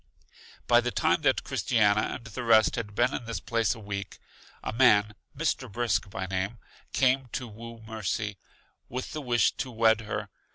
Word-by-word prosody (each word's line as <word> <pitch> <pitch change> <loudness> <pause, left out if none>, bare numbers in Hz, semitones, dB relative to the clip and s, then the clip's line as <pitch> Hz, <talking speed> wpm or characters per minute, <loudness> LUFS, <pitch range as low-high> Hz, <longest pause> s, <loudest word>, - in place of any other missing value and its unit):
By 120 0 +5
the 125 - -1
time 110 - +1
that - - +2
Christiana 105 -3 +2
and 120 - -10
the 115 +2 -6
rest 110 -2 +5
had 105 -3 -5
been 120 +4 +2
in 120 - -4
this 115 0 -3
place 115 0 0
a - - -11
week, 100 -2 -5 0.5
a - - -3
man, 105 -4 +5 0.2
Mr. 135 -6 -1
Brisk 115 -1 0
by 95 0 -4
name, 95 +4 -2 0.3
came 130 0 +2
to 125 - -3
woo 115 +1 -10
Mercy, 105 -2 -3 0.5
with 125 +5 -5
the 155 - -4
wish 120 -5 +3
to 130 - -3
wed 110 -2 +3
her. 105 -1 -4
115 Hz, 175 wpm, -28 LUFS, 105-120 Hz, 0.5 s, By